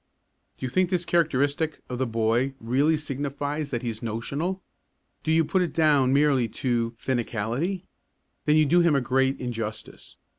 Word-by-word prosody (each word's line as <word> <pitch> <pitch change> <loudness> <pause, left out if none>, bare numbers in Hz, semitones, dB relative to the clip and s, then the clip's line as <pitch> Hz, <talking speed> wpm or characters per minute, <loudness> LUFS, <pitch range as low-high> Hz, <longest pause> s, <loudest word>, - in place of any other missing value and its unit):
Do - - -5
you 125 - -4
think 185 +4 +2
this 180 -2 0
characteristic 155 -1 +1
of 125 -1 -5
the 130 - 0
boy 115 +4 +1
really 140 +7 +2
signifies 145 +1 -3
that 120 -3 -3
he 120 - -1
is 110 +1 -9
"notional"? 140 - -3 0.6
Do 160 - -1
you 160 0 +4
put 190 +4 +1
it 175 - -1
down 145 -5 +3
merely 140 -3 +3
as - - -6 0.5
"finicality"? 120 - -2 0.6
Then 150 - +4
you 155 0 +5
do 170 +5 +4
him 170 -4 +4
a 140 - +2
great 135 +2 +1
injustice. 115 -4 -6
140 Hz, 170 wpm, -26 LUFS, 125-160 Hz, 0.6 s, you